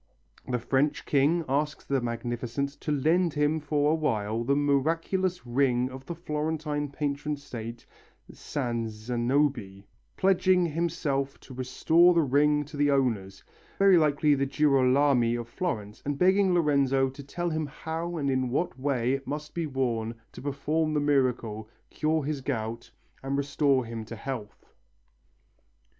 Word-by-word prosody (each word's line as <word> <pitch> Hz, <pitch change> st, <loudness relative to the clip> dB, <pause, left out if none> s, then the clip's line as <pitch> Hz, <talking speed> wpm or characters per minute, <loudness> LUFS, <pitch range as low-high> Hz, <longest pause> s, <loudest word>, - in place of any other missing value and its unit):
The 125 Hz, -1 st, 0 dB
French 135 Hz, +5 st, 0 dB
king 150 Hz, +4 st, +2 dB
asks 145 Hz, +3 st, -1 dB
the 135 Hz, -2 st, 0 dB
Magnificent 120 Hz, +3 st, -3 dB
to 150 Hz, -, -2 dB
lend 160 Hz, +4 st, +2 dB
him 150 Hz, +2 st, +2 dB
for 150 Hz, 0 st, +1 dB
a -, -, +3 dB
while 115 Hz, -8 st, -1 dB
the 140 Hz, +4 st, +2 dB
miraculous 165 Hz, +6 st, 0 dB
ring 125 Hz, 0 st, +1 dB
of 130 Hz, +1 st, -10 dB
the 170 Hz, -, -4 dB
Florentine 150 Hz, -2 st, -2 dB
patron 145 Hz, +1 st, -2 dB
saint, 120 Hz, -4 st, -8 dB, 0.5 s
San 120 Hz, -4 st, -3 dB
Zanobi, 120 Hz, -2 st, -1 dB, 0.3 s
pledging 185 Hz, -1 st, +3 dB
himself 150 Hz, -4 st, -2 dB
to 130 Hz, -, -12 dB
restore 160 Hz, +7 st, +3 dB
the 165 Hz, -, +4 dB
ring 150 Hz, +2 st, +2 dB
to 150 Hz, +1 st, -10 dB
the 145 Hz, 0 st, +3 dB
owners 115 Hz, -9 st, 0 dB, 0.3 s
very 195 Hz, -1 st, +6 dB
likely 150 Hz, -1 st, +3 dB
the 140 Hz, -1 st, +1 dB
Girolami 135 Hz, -3 st, +3 dB
of 120 Hz, -1 st, -4 dB
Florence 110 Hz, -, -4 dB
and 145 Hz, 0 st, -2 dB
begging 190 Hz, +2 st, +4 dB
Lorenzo 140 Hz, -5 st, +3 dB
to 135 Hz, -, -10 dB
tell 175 Hz, +5 st, -3 dB
him 155 Hz, -1 st, -2 dB
how 165 Hz, +4 st, -5 dB
and 145 Hz, -3 st, -1 dB
in 130 Hz, -1 st, 0 dB
what 135 Hz, 0 st, -2 dB
way 130 Hz, -2 st, 0 dB
it 135 Hz, 0 st, -4 dB
must 150 Hz, +1 st, -5 dB
be 170 Hz, -2 st, -2 dB
worn 120 Hz, -4 st, -1 dB, 0.2 s
to -, -, -10 dB
perform 150 Hz, +3 st, -1 dB
the -, -, +3 dB
miracle, 125 Hz, -7 st, 0 dB, 0.2 s
cure 155 Hz, 0 st, 0 dB
his 145 Hz, -1 st, -3 dB
gout 115 Hz, -3 st, -4 dB, 0.3 s
and 135 Hz, +1 st, -2 dB
restore 140 Hz, -2 st, +1 dB
him 115 Hz, -1 st, -6 dB
to 115 Hz, -, -8 dB
health. 115 Hz, -2 st, -7 dB
140 Hz, 150 wpm, -28 LUFS, 125-155 Hz, 0.5 s, very